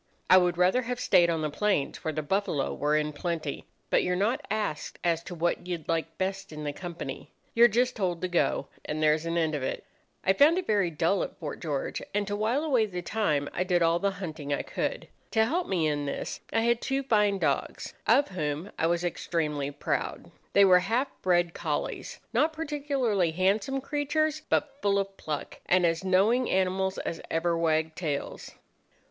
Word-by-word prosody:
I 185 - +10
would 175 -1 +1
rather 185 +8 +4
have 250 0 -4
stayed 180 -8 +4
on 165 -2 0
the 150 - -1
plains, 195 -4 0
where 160 - -1
the 155 0 -3
buffalo 160 -4 0
were 150 +1 +1
in 150 0 -1
plenty; 160 -2 -4 0.2
but - - +4
you're 180 - 0
not 210 +7 0
asked 210 -8 -2
as 165 -1 +1
to 175 - -6
what 175 +1 -1
you'd 175 -3 -4
like 165 -1 -2
best 195 0 -3
in 150 -1 -7
the 145 -1 -2
company. 175 +1 -7 0.2
You're 235 0 +7
just 245 +3 +1
told 180 -5 -1
to - - +1
go, 175 -1 +1 0.2
and 155 +1 -3
there's 155 +1 +3
an 165 +1 -1
end 160 -2 +1
of 150 - -2
it. 130 - -3 0.4
I 190 - +5
found 295 - +5
it 370 - -1
very 205 -5 +2
dull 170 +4 +1
at - - -5
Fort 155 -4 -6
George, 145 -4 -3
and 205 0 +1
to 205 0 -2
while 225 +8 0
away 255 -8 +2
the 180 -3 -5
time 155 -9 0
I 180 - 0
did 180 -2 +2
all 165 +1 +3
the 200 - +1
hunting 155 -6 -5
I 140 - 0
could. - - -3 0.3
To 220 -1 +4
help 340 +9 -1
me 175 -4 +1
in 145 -1 0
this 140 - -4
I 225 - +2
had 235 0 +2
two 270 0 -1
fine 210 -5 +3
dogs, - - -1
of 285 - +4
whom 155 0 -3
I 165 - +3
was 170 +1 0
extremely 150 -5 -1
proud. 145 - -3 0.2
They 200 - +7
were 180 -1 +7
half 230 +9 0
bred 175 -2 +2
collies, - - -3 0.2
not 315 +1 +2
particularly 280 - 0
handsome 195 +9 +1
creatures, 300 +2 0
but 280 -1 0
full 200 -1 +2
of 195 0 -2
pluck, 150 -2 -5
and 180 0 +4
as 165 +1 +1
knowing 205 +7 +3
animals 190 0 +1
as 165 - -4
ever 170 +1 +1
wagged 160 -1 +1
tails. 150 -5 -4
185 Hz, 200 wpm, -28 LUFS, 160-220 Hz, 0.4 s, I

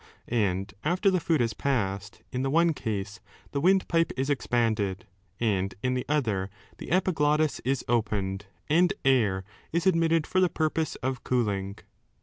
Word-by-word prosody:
And 100 -4 0
after 180 +5 +2
the 185 - +2
food 160 -3 +1
has 115 -2 0
passed, 100 -6 -2
in 125 - -2
the 135 - 0
one 165 +3 +3
case 105 -5 -4 0.3
the 140 - -1
windpipe 175 -2 +3
is 135 +2 0
expanded, 115 -7 0 0.3
and 100 -4 0
in 125 0 +1
the 125 -1 -2
other 110 -11 0 0.3
the - - -8
epiglottis 155 -4 +2
is 135 0 -1
opened, 105 -4 -1 0.2
and 175 +5 +4
air 110 -8 +3 0.3
is 170 +2 0
admitted 165 -3 +3
for 185 - 0
the 185 -1 +4
purpose 160 -1 -1
of 130 -1 -2
cooling. 100 -5 -1
130 Hz, 150 wpm, -27 LUFS, 105-160 Hz, 0.3 s, and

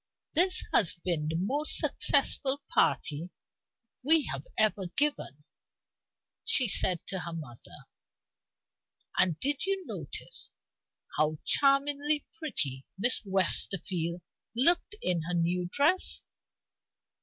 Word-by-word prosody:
"This 365 +3 +3
has 180 - +3
been 170 -3 -3
the 160 - -3
most 270 - +2
successful 275 0 +2
party 155 +4 0 0.7
we 315 +2 +5
have 140 +1 -7
ever 210 -3 +1
given," 285 - -2 1.0
she 265 - +5
said 185 -3 +1
to 190 - -2
her 170 -1 -6
mother. 150 -8 -10 1.3
"And 170 -4 +2
did 285 +6 -1
you 390 -2 -2
notice - - -6 0.7
how 155 0 +1
charmingly 285 +1 +2
pretty 145 - -3
Miss 245 +6 +1
Westerfield 180 -3 +1 0.3
looked 345 - +2
in 175 -2 +1
her 180 - -1
new 175 +1 0
dress?" 315 +7 +1
195 Hz, 105 wpm, -29 LUFS, -, 1.3 s, we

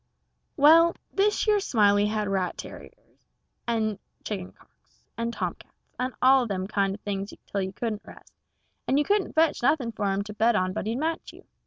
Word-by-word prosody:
Well, 330 +4 +6 0.2
thish 415 +1 +2
yer 420 -1 +3
Smiley 205 - +3
had 210 -1 -1
rat 190 -2 -1
tarriers, - - -12 0.4
and 220 -3 -1 0.2
chicken 190 -4 -5
cocks, - - -29
and 230 0 -2
tom - - -3
cats, - - -21 0.2
and 255 0 -2
all 260 -1 +5
them 190 -3 -2
kind 195 -2 0
of 205 - -14
things 200 0 -4
till 200 - -3
you 190 0 -3
couldn't 215 +1 -4
rest, - - -15 0.5
and 270 - +2
you 295 - +2
couldn't 410 -2 +1
fetch 320 0 +2
nothing 250 -2 +1
for 205 -3 -1
him 195 +1 -1
to 210 +1 -8
bet 225 +2 +2
on 185 -2 0
but 215 - -4
he'd 225 - -1
match 320 +3 -3
you. - - -16
220 Hz, 190 wpm, -26 LUFS, 200-275 Hz, 0.5 s, Well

